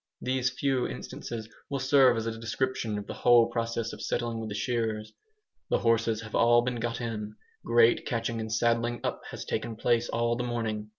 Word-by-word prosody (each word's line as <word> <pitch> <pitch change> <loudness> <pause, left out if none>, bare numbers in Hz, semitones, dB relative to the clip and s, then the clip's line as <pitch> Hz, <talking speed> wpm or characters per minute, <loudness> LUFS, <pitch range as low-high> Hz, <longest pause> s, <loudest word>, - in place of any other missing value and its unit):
These 130 0 0
few 130 -1 0
instances 115 -2 -6 0.2
will 140 - -1
serve 130 -2 +5
as 115 - -2
a 115 0 -2
description 115 -1 -2
of 105 - -5
the - - -6
whole 120 -1 +5
process 115 -1 -2
of - - -9
settling 115 -1 -2
with 110 -1 -5
the 105 - -4
shearers. 110 -1 -2 0.6
The - - +3
horses 115 -1 +1
have 110 -1 -10
all 120 0 +5
been 125 0 -2
got 115 0 -2
in. 105 -3 -4 0.3
Great 115 0 +4
catching 115 -1 -2
and 110 0 -4
saddling 115 +1 +1
up - - -2
has - - -7
taken 115 - -3
place 120 +1 +1
all 115 0 +1
the 120 - -2
morning. 110 -3 -3
115 Hz, 190 wpm, -28 LUFS, 115-120 Hz, 0.6 s, serve